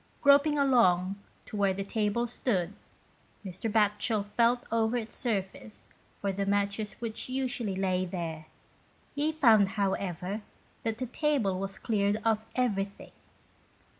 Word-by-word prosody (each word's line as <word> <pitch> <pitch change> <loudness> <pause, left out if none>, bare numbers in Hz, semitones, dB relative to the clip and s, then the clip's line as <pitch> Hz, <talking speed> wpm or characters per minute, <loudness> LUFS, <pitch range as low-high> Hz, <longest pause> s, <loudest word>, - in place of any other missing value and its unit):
Groping 285 +1 +5
along 200 -9 +3 0.3
to - - -8
where 200 -2 +2
the 195 - -3
table 215 +3 0
stood, 205 -6 -1 0.7
Mr. 190 +4 -4
Batchel 210 0 +2
felt 240 +2 +3
over 225 +1 +2
its 225 -2 -5
surface 210 -2 -3 0.3
for 200 - -2
the 195 +1 -2
matches 200 +1 0
which 230 +1 -4
usually 250 -6 -1
lay 185 -1 0
there; 165 -3 -5 0.7
he 295 +2 0
found, 225 -11 +5
how 195 -1 +2
ever, 185 +3 -4 0.4
that 225 -1 -2
the 255 - -2
table 250 -8 0
was 195 0 -4
cleared 205 -2 +1
of 220 -1 +2
everything. 200 -6 -1
210 Hz, 135 wpm, -29 LUFS, 195-235 Hz, 0.7 s, Groping